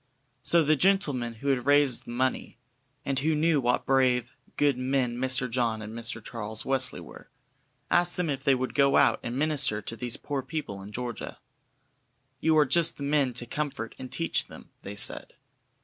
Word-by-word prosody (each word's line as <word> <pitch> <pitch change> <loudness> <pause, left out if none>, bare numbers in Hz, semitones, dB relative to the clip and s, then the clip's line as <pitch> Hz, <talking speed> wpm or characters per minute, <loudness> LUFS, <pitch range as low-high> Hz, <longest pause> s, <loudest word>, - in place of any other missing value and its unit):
So 170 -1 +4
the 155 +1 +3
gentlemen 145 -10 +1
who 140 +6 -3
had 130 -1 0
raised 145 -3 +3
the - - -12
money, 130 +2 -1 0.5
and 135 -1 0
who 155 +3 +1
knew 155 -1 +2
what 125 0 +1
brave, 125 -2 +2 0.2
good 145 -2 +3
men 130 -1 0
Mr. 130 +1 0
John 115 -2 -1
and 110 0 -8
Mr. 115 -1 -7
Charles 110 -2 -3
Wesley 130 -1 +1
were, - - -13 0.6
asked 175 0 +2
them 180 -2 0
if 135 -2 -3
they 140 -2 +4
would 130 0 -3
go 140 -1 +4
out - - +4
and 120 +1 -4
minister 145 -7 +1
to 115 - -6
these 120 +1 -1
poor 140 -2 -3
people 135 -10 -5
in 100 +2 -10
Georgia. 120 +1 -5 1.0
"You 160 +2 +3
are 150 - +6
just 165 +5 +2
the 140 - -6
men 140 -3 +1
to 120 +1 -2
comfort 135 -3 -4
and 130 -1 -8
teach 165 - -1
them," - - -14
they 100 - -7
said. - - +1
130 Hz, 185 wpm, -27 LUFS, 120-145 Hz, 1.0 s, are